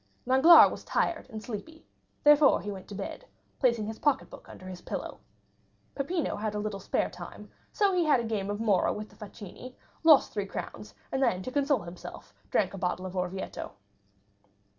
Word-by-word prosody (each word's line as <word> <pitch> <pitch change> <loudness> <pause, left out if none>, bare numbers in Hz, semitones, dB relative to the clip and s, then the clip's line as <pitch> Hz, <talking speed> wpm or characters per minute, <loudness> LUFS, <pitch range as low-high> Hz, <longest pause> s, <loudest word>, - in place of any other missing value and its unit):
Danglars 265 +7 +8
was - - -7
tired 330 -5 -1
and 220 -3 -7
sleepy; 240 +9 -6
he 320 - -21 0.4
therefore 295 -1 +6
went 195 -2 -6
to 205 - -8
bed, 200 - -6 0.4
placing 235 -5 +2
his 220 +1 -6
pocketbook 290 -3 -1
under 185 - -12
his 180 -1 -8
pillow. - - -6 0.7
Peppino 320 +4 -2
had 210 0 -3
a - - -1
little 210 -1 -3
spare - - 0
time, - - -10 0.2
so 405 -3 +2
he 360 -1 +2
had 295 -5 +4
a - - -2
game 210 -3 -2
of 205 0 -3
morra 210 -5 +2
with 210 0 -6
the - - -19
facchini, 210 +4 -10 0.3
lost 310 -4 +6
three 205 -2 -2
crowns, 105 - -7 0.2
and 265 - -1
then 225 -8 +1
to 255 - -5
console 280 -3 +1
himself 170 +1 -10 0.2
drank - - +1
a 195 - -6
bottle 180 0 -2
of 185 0 -7
Orvieto. 185 +1 -4
215 Hz, 185 wpm, -29 LUFS, 195-275 Hz, 0.7 s, Danglars